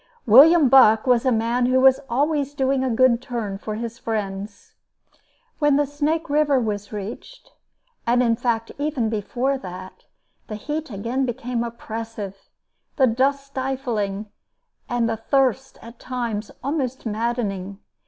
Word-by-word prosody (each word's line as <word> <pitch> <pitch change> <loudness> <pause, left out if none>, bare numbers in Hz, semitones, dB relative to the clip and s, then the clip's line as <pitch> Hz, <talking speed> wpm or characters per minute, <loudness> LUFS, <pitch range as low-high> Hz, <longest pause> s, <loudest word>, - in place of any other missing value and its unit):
William 285 +7 +7
Buck 225 -4 +6
was 250 -1 +3
a - - +4
man 235 +2 +1
who 255 +1 +3
was 265 0 +5
always 285 +2 0
doing 265 -1 +1
a 260 - 0
good 240 0 +3
turn 225 -6 -4
for 215 0 -5
his 230 +2 -6
friends. 205 -3 -5 0.9
When 290 -1 +3
Snake 300 +3 -1
River 290 -2 +2
was 205 -3 -3
reached, 215 - -8 0.6
and 245 +1 +3
in 230 -1 +2
fact 230 -1 -1
even 285 -6 -1
before 245 +5 -1
that, 185 -2 -10 0.4
the 215 - -5
heat 295 +8 -4
again 240 +5 -2
became 240 0 -3
oppressive, 225 -4 -7 0.5
the 265 - +4
dust 270 +4 +1
stifling, 240 -7 -3 0.6
and 240 -1 +1
the 225 -1 -2
thirst 265 +2 0
at 230 +1 -12
times 235 -4 -4
almost 265 -3 -2
maddening. 210 -4 -2
240 Hz, 135 wpm, -22 LUFS, 220-270 Hz, 0.9 s, William